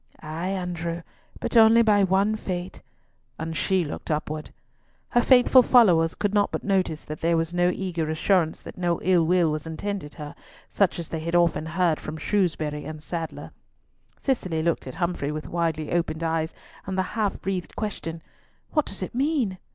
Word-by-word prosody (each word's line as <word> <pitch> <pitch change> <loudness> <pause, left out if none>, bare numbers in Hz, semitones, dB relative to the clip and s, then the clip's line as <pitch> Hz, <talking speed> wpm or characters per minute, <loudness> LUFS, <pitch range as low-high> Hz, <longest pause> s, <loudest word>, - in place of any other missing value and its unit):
"Ay, 160 +3 -4
Andrew, 175 -3 -3 0.4
but - - -4
only 225 +1 +7
by 205 -2 +4
one 195 +3 +2
fate;" 185 -3 -5 0.6
and 160 0 -4
she 190 0 +1
looked 145 - -7
upwards. 155 0 -2 0.6
Her 240 - +3
faithful 255 +1 +6
followers 180 -11 +5
could 205 -1 -1
not 205 -1 +2
but - - -3
notice 185 -6 0
that 155 0 -7
there 165 0 +2
was 165 +1 -1
no 175 0 +3
eager 175 -4 -2
assurance 160 +1 +1
that - - -10
no 175 -2 0
ill 180 -2 +4
was 160 -3 +1
intended 160 -1 -4
her, 150 -2 -7 0.3
such 200 -3 +1
as 170 -2 -5
they 160 - -3
had 170 +2 -2
often 170 -2 +2
heard 165 -1 +1
from 155 +1 -6
Shrewsbury 160 -6 -1
and 155 0 -8
Sadler. 165 -1 -5 0.7
Cicely 185 - -1
looked 170 -4 0
at 130 - -7
Humfrey 170 -5 -1
with 155 0 -5
widely 165 -3 -1
opened 165 -2 -1
eyes, 160 0 -1 0.3
and 190 -1 -3
the 190 - +2
half 215 -3 -1
breathed 190 -2 -4
question, 165 -6 -4 0.5
"What 300 -2 +1
does 195 - -5
it - - -6
mean?" 255 - 0
175 Hz, 175 wpm, -25 LUFS, 160-195 Hz, 0.7 s, only